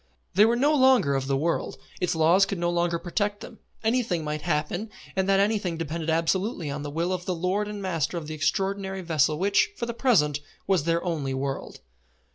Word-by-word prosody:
They 205 Hz, +4 st, +6 dB
were 230 Hz, +1 st, +3 dB
no 285 Hz, +5 st, +3 dB
longer 260 Hz, -, +4 dB
of 135 Hz, -1 st, -1 dB
the 135 Hz, -1 st, +1 dB
world. 165 Hz, +4 st, -1 dB, 0.2 s
Its 180 Hz, -, 0 dB
laws 170 Hz, +5 st, +4 dB
could 195 Hz, -, -3 dB
no 175 Hz, 0 st, 0 dB
longer 170 Hz, 0 st, +1 dB
protect 205 Hz, +4 st, -2 dB
them. 230 Hz, -, -10 dB, 0.2 s
Anything 220 Hz, -7 st, +1 dB
might 150 Hz, 0 st, -3 dB
happen, 175 Hz, +6 st, -2 dB, 0.3 s
and 190 Hz, 0 st, 0 dB
that 195 Hz, 0 st, +4 dB
anything 200 Hz, -4 st, +1 dB
depended 165 Hz, 0 st, -3 dB
absolutely 165 Hz, -, 0 dB
on 145 Hz, +1 st, -4 dB
the 145 Hz, -, -5 dB
will 170 Hz, +5 st, -1 dB
of 180 Hz, -1 st, -4 dB
the 185 Hz, -, -1 dB
lord 185 Hz, +5 st, -1 dB
and 205 Hz, -1 st, -6 dB
master 170 Hz, -3 st, -1 dB
of 165 Hz, -, -5 dB
the 155 Hz, -, -6 dB
extraordinary 190 Hz, +4 st, -1 dB
vessel 155 Hz, -3 st, +1 dB
which, 200 Hz, +3 st, +2 dB
for 235 Hz, -, -2 dB
the 235 Hz, -, -4 dB
present, 160 Hz, -, +2 dB, 0.3 s
was 185 Hz, -6 st, +1 dB
their 170 Hz, 0 st, +1 dB
only 150 Hz, -7 st, -2 dB
world. 135 Hz, 0 st, -4 dB
175 Hz, 205 wpm, -26 LUFS, 155-200 Hz, 0.3 s, They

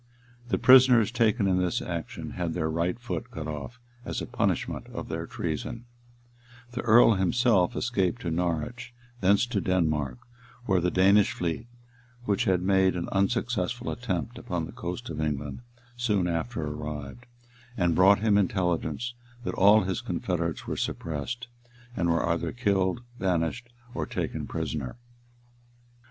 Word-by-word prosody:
The -, -, +2 dB
prisoners 125 Hz, -2 st, +7 dB
taken 115 Hz, -3 st, +2 dB
in 90 Hz, -1 st, +2 dB
this 90 Hz, -2 st, 0 dB
action -, -, -5 dB
had 85 Hz, -3 st, -3 dB
their 80 Hz, -2 st, -1 dB
right 85 Hz, +4 st, 0 dB
foot 120 Hz, 0 st, -5 dB
cut 80 Hz, -10 st, -6 dB
off, 80 Hz, -, -6 dB, 0.2 s
as -, -, -3 dB
a -, -, -4 dB
punishment -, -, -1 dB
of -, -, -7 dB
their -, -, -4 dB
treason 100 Hz, +9 st, -4 dB, 0.9 s
the 120 Hz, -, -3 dB
earl 115 Hz, 0 st, +6 dB
himself 95 Hz, 0 st, +2 dB
escaped 120 Hz, -1 st, 0 dB
to 85 Hz, -, -2 dB
Norwich, 90 Hz, +9 st, -2 dB, 0.2 s
thence 100 Hz, +3 st, +4 dB
to 115 Hz, -5 st, -1 dB
Denmark 75 Hz, -9 st, 0 dB, 0.5 s
where 95 Hz, -5 st, +2 dB
the 90 Hz, -, +2 dB
Danish 100 Hz, +3 st, +4 dB
fleet, 85 Hz, +6 st, -3 dB, 0.6 s
which 100 Hz, -4 st, +1 dB
had 90 Hz, -2 st, +2 dB
made 95 Hz, -1 st, +3 dB
an 85 Hz, -, -3 dB
unsuccessful 115 Hz, +2 st, 0 dB
attempt 115 Hz, +1 st, -3 dB
upon 90 Hz, -9 st, -3 dB
the -, -, -9 dB
coast 90 Hz, +8 st, -5 dB
of 80 Hz, -1 st, -4 dB
England,[*] 75 Hz, -2 st, -2 dB, 0.4 s
soon 105 Hz, -7 st, +1 dB
after 85 Hz, +1 st, -2 dB
arrived, 75 Hz, -, -6 dB, 0.5 s
and 85 Hz, -4 st, +2 dB
brought 95 Hz, +4 st, +5 dB
him 105 Hz, -2 st, +4 dB
intelligence, 95 Hz, +3 st, -1 dB, 0.3 s
that -, -, -3 dB
all 105 Hz, +3 st, +6 dB
his 95 Hz, -1 st, -2 dB
confederates 85 Hz, -3 st, -2 dB
were -, -, -3 dB
suppressed, 115 Hz, -, -3 dB, 0.5 s
and 85 Hz, -5 st, 0 dB
were 85 Hz, 0 st, +1 dB
either 85 Hz, 0 st, 0 dB
killed, 100 Hz, -2 st, 0 dB, 0.2 s
banished, 95 Hz, +6 st, -1 dB, 0.2 s
or -, -, -3 dB
taken -, -, -3 dB
prisoners. 80 Hz, -5 st, -3 dB
95 Hz, 145 wpm, -27 LUFS, 85-115 Hz, 0.9 s, prisoners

